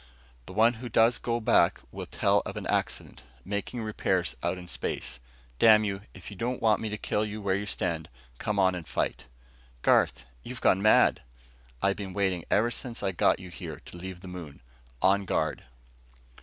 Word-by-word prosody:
The -, -, -8 dB
one 115 Hz, +4 st, +5 dB
who 125 Hz, -, -5 dB
goes 115 Hz, +2 st, +4 dB
back 115 Hz, -6 st, +2 dB
will -, -, -6 dB
tell -, -, +2 dB
of -, -, -6 dB
an -, -, -5 dB
accident, -, -, -2 dB, 0.2 s
making 100 Hz, +4 st, -3 dB
repairs 95 Hz, -7 st, 0 dB
out -, -, -1 dB
in 90 Hz, -1 st, -9 dB
space. 65 Hz, -6 st, -3 dB, 0.4 s
Damn 110 Hz, -1 st, +7 dB
you, 100 Hz, -2 st, -2 dB
if 90 Hz, -5 st, -10 dB
you -, -, -8 dB
don't 120 Hz, +5 st, -2 dB
want 110 Hz, -2 st, +3 dB
me 110 Hz, -, -2 dB
to 105 Hz, -, -3 dB
kill 105 Hz, +1 st, -1 dB
you 105 Hz, 0 st, -4 dB
where 100 Hz, -2 st, 0 dB
you 100 Hz, +2 st, -2 dB
stand, 85 Hz, -4 st, -2 dB, 0.3 s
come -, -, -1 dB
on 95 Hz, 0 st, +4 dB
and 85 Hz, -3 st, -6 dB
fight." -, -, -2 dB, 0.6 s
"Garth, -, -, +3 dB, 0.2 s
you've 125 Hz, 0 st, -7 dB
gone 95 Hz, -4 st, +3 dB
mad." 110 Hz, +1 st, +5 dB, 0.6 s
"I've 100 Hz, 0 st, +2 dB
been 100 Hz, -3 st, -6 dB
waiting 95 Hz, -4 st, 0 dB
ever 115 Hz, +3 st, +3 dB
since 120 Hz, 0 st, -5 dB
I 95 Hz, -, +1 dB
got 90 Hz, -, +3 dB
you 90 Hz, -1 st, -10 dB
to 75 Hz, -, -7 dB, 0.2 s
leave 90 Hz, 0 st, -7 dB
the 95 Hz, -, -10 dB
moon. 85 Hz, -8 st, -9 dB, 0.4 s
On 100 Hz, +1 st, +4 dB
guard!" 95 Hz, -, -1 dB
100 Hz, 185 wpm, -28 LUFS, 90-110 Hz, 0.6 s, Damn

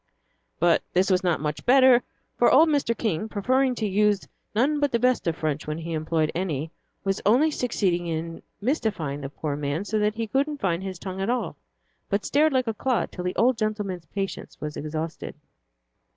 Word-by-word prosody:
But 170 Hz, 0 st, +4 dB
this 185 Hz, +2 st, +3 dB
was 185 Hz, 0 st, +2 dB
not 175 Hz, -3 st, +1 dB
much 150 Hz, -1 st, -3 dB
better, 255 Hz, -1 st, +6 dB, 0.3 s
for 240 Hz, -, +4 dB
old 315 Hz, +4 st, +6 dB
Mr. 280 Hz, -6 st, +1 dB
King, 215 Hz, -2 st, -1 dB
preferring 255 Hz, +5 st, +1 dB
to 220 Hz, -2 st, -1 dB
use 205 Hz, 0 st, +2 dB, 0.3 s
none 285 Hz, +7 st, +2 dB
but 290 Hz, -1 st, +1 dB
the 235 Hz, -, +2 dB
best 250 Hz, -4 st, +1 dB
of 165 Hz, -, +1 dB
French 155 Hz, -2 st, -2 dB
when 155 Hz, 0 st, -2 dB
he 165 Hz, 0 st, -5 dB
employed 155 Hz, 0 st, 0 dB
any, 160 Hz, -4 st, -2 dB, 0.3 s
was 195 Hz, -1 st, -1 dB
only 260 Hz, +10 st, +4 dB
succeeding 185 Hz, -10 st, 0 dB
in 165 Hz, 0 st, -4 dB, 0.2 s
mystifying 200 Hz, -, -1 dB
the 135 Hz, -, -5 dB
poor 145 Hz, 0 st, -4 dB
man 145 Hz, +5 st, -2 dB
so 215 Hz, +1 st, 0 dB
that 210 Hz, 0 st, +1 dB
he 225 Hz, 0 st, -2 dB
couldn't 280 Hz, +6 st, 0 dB
find 180 Hz, -8 st, -1 dB
his 190 Hz, -1 st, -5 dB
tongue 190 Hz, +2 st, -6 dB
at 195 Hz, -, -1 dB
all, 245 Hz, 0 st, -1 dB, 0.5 s
but 200 Hz, +1 st, 0 dB
stared 305 Hz, +3 st, +3 dB
like 260 Hz, -2 st, +1 dB
a 225 Hz, -, -1 dB
clod 250 Hz, +3 st, -1 dB
till 180 Hz, -, -6 dB
the 180 Hz, -, -2 dB
old 245 Hz, 0 st, +3 dB
gentleman's 210 Hz, -5 st, -2 dB
patience 195 Hz, -1 st, -5 dB
was 150 Hz, -1 st, -5 dB
exhausted. 155 Hz, +2 st, -5 dB
200 Hz, 195 wpm, -25 LUFS, 165-245 Hz, 0.5 s, better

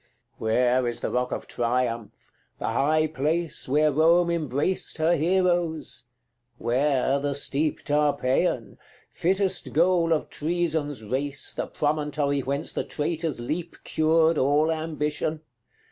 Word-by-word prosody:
CXII. -, -, -39 dB
Where 125 Hz, +3 st, +2 dB
is 120 Hz, -, -3 dB
the -, -, -2 dB
rock 125 Hz, 0 st, 0 dB
of -, -, -4 dB
Triumph, 120 Hz, -2 st, -2 dB, 0.3 s
the -, -, -2 dB
high 150 Hz, +7 st, +2 dB
place 155 Hz, +2 st, -2 dB
Where 150 Hz, +2 st, +3 dB
Rome 170 Hz, +4 st, +4 dB
embraced 155 Hz, +2 st, -1 dB
her 165 Hz, +2 st, +3 dB
heroes? 170 Hz, -5 st, 0 dB, 0.5 s
where 135 Hz, +2 st, +1 dB
the 140 Hz, 0 st, -2 dB
steep 145 Hz, +2 st, 0 dB
Tarpeian 145 Hz, -, +1 dB, 0.3 s
fittest 190 Hz, +1 st, 0 dB
goal 170 Hz, +1 st, +3 dB
of 160 Hz, -, 0 dB
Treason's 155 Hz, -5 st, -1 dB
race, 140 Hz, +6 st, -3 dB
The -, -, -3 dB
promontory 145 Hz, -1 st, 0 dB
whence 140 Hz, +2 st, -2 dB
the -, -, -2 dB
traitor's 160 Hz, -3 st, -2 dB
leap 165 Hz, +7 st, -4 dB
Cured 160 Hz, 0 st, +3 dB
all 145 Hz, +4 st, +3 dB
ambition? 155 Hz, -1 st, -2 dB
150 Hz, 125 wpm, -26 LUFS, 135-165 Hz, 0.5 s, Rome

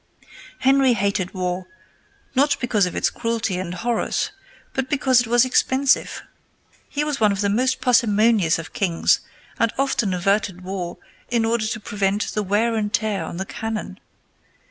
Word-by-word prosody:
Henry 270 Hz, -1 st, +4 dB
hated 200 Hz, -3 st, -1 dB
war, 180 Hz, 0 st, -2 dB, 0.7 s
not 280 Hz, +2 st, +2 dB
because 215 Hz, -6 st, +1 dB
of 180 Hz, -, -6 dB
its -, -, +1 dB
cruelty 230 Hz, -5 st, -2 dB
and 185 Hz, -2 st, -4 dB
horrors, 235 Hz, -, -1 dB, 0.4 s
but 265 Hz, -1 st, -2 dB
because 265 Hz, -4 st, +3 dB
it 245 Hz, -, -4 dB
was 240 Hz, +2 st, +4 dB
expensive. 260 Hz, +1 st, +1 dB, 0.7 s
He 295 Hz, -, -1 dB
was 300 Hz, -2 st, -2 dB
one 210 Hz, -2 st, +4 dB
of 200 Hz, 0 st, -2 dB
the 200 Hz, -, +1 dB
most 255 Hz, +6 st, +1 dB
parsimonious 225 Hz, -, +3 dB
of 160 Hz, -1 st, -8 dB
kings, 185 Hz, -8 st, +2 dB, 0.4 s
and 230 Hz, -1 st, +2 dB
often 270 Hz, -7 st, +1 dB
averted 195 Hz, 0 st, 0 dB
war 180 Hz, -2 st, -5 dB, 0.3 s
in 235 Hz, -2 st, +1 dB
order 225 Hz, -1 st, 0 dB
to 215 Hz, -, -3 dB
prevent 205 Hz, 0 st, -1 dB
the 210 Hz, -, 0 dB
wear 210 Hz, +4 st, +1 dB
and 210 Hz, -2 st, -1 dB
tear 210 Hz, -2 st, 0 dB
on -, -, -6 dB
the 190 Hz, -, -3 dB
cannon. 220 Hz, +2 st, -5 dB
215 Hz, 160 wpm, -22 LUFS, 195-245 Hz, 0.7 s, Henry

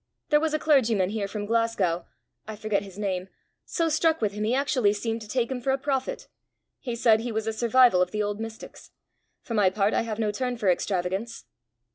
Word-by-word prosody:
There 300 Hz, -1 st, +5 dB
was 315 Hz, 0 st, 0 dB
a -, -, +3 dB
clergyman 230 Hz, -11 st, +2 dB
here 210 Hz, -2 st, -2 dB
from 205 Hz, 0 st, -5 dB
Glasgow 205 Hz, -7 st, 0 dB, 0.4 s
I 220 Hz, -, -6 dB
forget 210 Hz, -1 st, -1 dB
his 195 Hz, -1 st, -11 dB
name 190 Hz, -3 st, -2 dB, 0.4 s
so 335 Hz, -2 st, 0 dB
struck 320 Hz, +1 st, +2 dB
with 215 Hz, -3 st, 0 dB
him 210 Hz, +1 st, -4 dB
he -, -, 0 dB
seemed 265 Hz, -, +2 dB
actually 255 Hz, -7 st, +2 dB
to 225 Hz, 0 st, -3 dB
take 240 Hz, +2 st, -1 dB
him 250 Hz, -1 st, -3 dB
for 270 Hz, -, -2 dB
a 265 Hz, -, +3 dB
prophet. 270 Hz, -1 st, -2 dB, 0.5 s
He 240 Hz, -3 st, -4 dB
said 225 Hz, -2 st, +4 dB
he 235 Hz, +1 st, -4 dB
was 220 Hz, 0 st, -2 dB
a 225 Hz, -, -1 dB
survival 235 Hz, -3 st, +4 dB
of 180 Hz, -, +2 dB
the 210 Hz, +2 st, -1 dB
old 205 Hz, 0 st, -3 dB
mystics. 225 Hz, 0 st, -9 dB, 0.5 s
For 230 Hz, -, -6 dB
my 205 Hz, -4 st, +4 dB
part 200 Hz, +2 st, +1 dB
I -, -, +2 dB
have 225 Hz, -2 st, -4 dB
no 215 Hz, -2 st, 0 dB
turn 250 Hz, +2 st, -2 dB
for 210 Hz, -5 st, +1 dB
extravagance." 190 Hz, +5 st, -2 dB
220 Hz, 215 wpm, -26 LUFS, 205-250 Hz, 0.5 s, There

